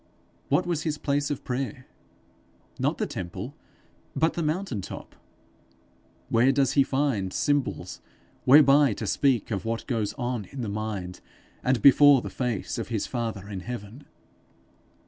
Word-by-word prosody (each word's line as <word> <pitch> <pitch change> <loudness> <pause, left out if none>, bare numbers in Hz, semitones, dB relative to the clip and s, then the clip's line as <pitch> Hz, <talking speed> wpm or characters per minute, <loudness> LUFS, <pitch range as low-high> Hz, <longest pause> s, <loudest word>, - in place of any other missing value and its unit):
What 180 - +2
was 170 -3 -1
his 155 -1 -2
place 145 -1 -1
of 145 - -4
prayer? 130 -1 -4 0.9
Not - - 0
the - - -1
temple, 85 -1 -6 0.6
but 160 +1 +2
the 170 - -3
mountain 155 - -2
top. - - -9 1.1
Where 120 +4 +4
does 135 -1 +2
he 140 - +5
find 135 -9 0
symbols 145 +4 -1 0.4
whereby 140 -1 +6
to 110 - -5
speak 125 +1 +1
of 100 - -2
what 115 0 -3
goes 115 -6 -1
on 120 -5 -3
in 135 +6 -8
the 110 - -3
mind 100 -4 -4 0.4
and 125 -3 +1
before 140 -1 +7
the - - -6
face 120 -6 -3
of - - -4
his 115 -4 -2
father 115 -5 -4
in 100 -2 -5
heaven? 120 +4 -8
125 Hz, 145 wpm, -26 LUFS, 110-145 Hz, 1.1 s, before